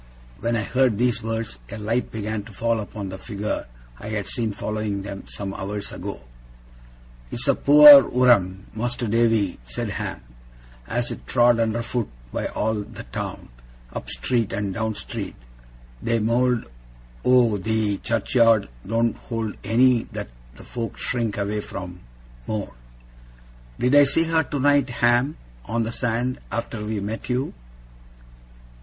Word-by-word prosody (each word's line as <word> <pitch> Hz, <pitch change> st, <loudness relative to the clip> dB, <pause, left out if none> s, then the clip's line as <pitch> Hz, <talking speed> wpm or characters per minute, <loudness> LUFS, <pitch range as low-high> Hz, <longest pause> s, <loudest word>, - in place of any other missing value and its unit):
When 115 Hz, 0 st, 0 dB
I 110 Hz, -, 0 dB
heard 125 Hz, 0 st, +2 dB
these 120 Hz, 0 st, +1 dB
words, 110 Hz, -, -4 dB
a -, -, -6 dB
light 115 Hz, +4 st, -1 dB
began 110 Hz, 0 st, -3 dB
to 115 Hz, -, -12 dB
fall 115 Hz, +3 st, 0 dB
upon 105 Hz, -2 st, -6 dB
the 95 Hz, 0 st, -7 dB
figure 105 Hz, -, -4 dB, 0.3 s
I -, -, -8 dB
had 105 Hz, -2 st, -2 dB
seen 115 Hz, -3 st, -2 dB
following 105 Hz, -1 st, -3 dB
them, 100 Hz, -1 st, -7 dB
some 100 Hz, -1 st, -5 dB
hours 100 Hz, +1 st, -4 dB
ago. -, -, -6 dB, 1.1 s
'It's -, -, -3 dB
a -, -, +5 dB
poor 145 Hz, 0 st, +10 dB
wurem, 100 Hz, -7 st, +3 dB
Mas'r 120 Hz, +1 st, -2 dB
Davy,' 115 Hz, -4 st, +2 dB
said -, -, -4 dB
Ham, -, -, -4 dB, 0.7 s
'as 120 Hz, +1 st, -1 dB
is -, -, -5 dB
trod 120 Hz, -1 st, +4 dB
under 115 Hz, +1 st, 0 dB
foot 120 Hz, -1 st, -2 dB, 0.2 s
by -, -, -1 dB
all 110 Hz, 0 st, -1 dB
the -, -, -9 dB
town. -, -, -5 dB, 0.4 s
Up -, -, -6 dB
street 120 Hz, -4 st, 0 dB
and 100 Hz, -1 st, -2 dB
down 110 Hz, +1 st, -2 dB
street. -, -, -6 dB, 0.7 s
The 115 Hz, 0 st, +1 dB
mowld 120 Hz, +2 st, +1 dB, 0.6 s
o' 120 Hz, -5 st, +4 dB
the 110 Hz, 0 st, 0 dB
churchyard 115 Hz, -2 st, +3 dB, 0.2 s
don't 115 Hz, +1 st, +1 dB
hold 115 Hz, -3 st, -4 dB
any 125 Hz, +1 st, +4 dB
that -, -, -5 dB, 0.3 s
the -, -, -13 dB
folk 115 Hz, -2 st, -5 dB
shrink 115 Hz, -4 st, -1 dB
away 105 Hz, +1 st, -1 dB
from, 90 Hz, -3 st, -7 dB, 0.5 s
more.' 105 Hz, -2 st, -3 dB, 1.0 s
'Did 125 Hz, +2 st, +1 dB
I 145 Hz, 0 st, +8 dB
see 145 Hz, +4 st, +2 dB
her 165 Hz, 0 st, +2 dB
tonight, 145 Hz, -2 st, +2 dB, 0.2 s
Ham, 120 Hz, +5 st, +3 dB, 0.3 s
on 115 Hz, +1 st, -1 dB
the 115 Hz, -, -3 dB
sand, 125 Hz, +1 st, -1 dB
after 115 Hz, -2 st, -3 dB
we 105 Hz, 0 st, -2 dB
met 105 Hz, +5 st, -5 dB
you? 125 Hz, +3 st, -1 dB
115 Hz, 150 wpm, -23 LUFS, 105-120 Hz, 1.1 s, poor